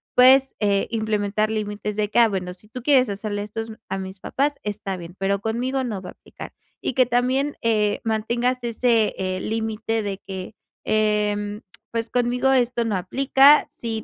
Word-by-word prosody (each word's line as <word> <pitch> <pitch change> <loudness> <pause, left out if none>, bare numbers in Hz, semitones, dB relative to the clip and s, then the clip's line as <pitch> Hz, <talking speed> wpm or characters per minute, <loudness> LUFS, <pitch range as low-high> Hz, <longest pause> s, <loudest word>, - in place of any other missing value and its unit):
puedes, 265 +2 +6
eh, 200 -2 +1
implementar 215 -1 0
límites 210 -1 -3
de 210 -1 -1
que: - - +3
"Ah, 235 - +7
bueno, 180 -3 -3
si 190 +4 -16
tú 250 +1 -8
quieres 260 -5 +4
hacerle 205 +1 -3
estos 225 +2 -6 0.2
a 195 - -2
mis 190 0 -7
papás, 285 +8 0
está 205 -2 -4
bien, 170 +1 -10
pero 195 +1 0
conmigo 250 +4 -1
no 215 -6 -4
va 180 - -8
a - - -16
aplicar". - - -11 0.3
Y - - -2
que 255 +1 +4
también, 255 +4 +1
eh, 210 -2 +1
mantengas 235 +3 -1
ese, 235 -1 +1
eh, 185 -1 -2
límite 225 0 -2
de 200 -1 -4
que, 190 +1 -7 0.3
em, 210 0 0 0.3
pues: 230 0 -2
"Conmigo 245 +2 +1
esto 240 -2 +2
no 215 -3 0
aplica, 270 +9 +5
sí 225 -2 -4
220 Hz, 175 wpm, -23 LUFS, 205-245 Hz, 0.3 s, Ah